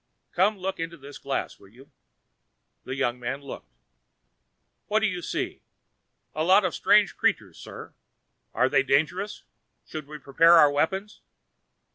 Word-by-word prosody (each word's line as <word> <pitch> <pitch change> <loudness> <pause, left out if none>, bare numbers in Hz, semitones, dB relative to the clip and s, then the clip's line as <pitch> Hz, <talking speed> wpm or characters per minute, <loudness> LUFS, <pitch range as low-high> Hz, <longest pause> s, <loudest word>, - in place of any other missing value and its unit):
"Come 200 +4 +2
look 190 0 -4
into 165 0 -5
this 140 0 -12
glass, 140 0 -4
will 100 - -17
you." 125 +8 -19 0.9
The 130 - -5
young 125 -3 -1
man 125 +3 -4
looked. 140 - -10 1.2
"What 215 +1 +1
do - - +2
you 180 -4 -2
see?" - - -4 0.7
"A 155 - -1
lot 190 +4 +5
of 180 - -1
strange 210 -2 +3
creatures, - - -1
sir. - - -10 0.6
Are 125 +3 +2
they 135 - +3
dangerous? 150 +9 -1 0.4
Should 155 -2 -8
we 150 +1 -8
prepare 160 +4 +4
our 150 -4 +7
weapons?" 190 +8 -2
155 Hz, 145 wpm, -26 LUFS, 135-185 Hz, 1.2 s, our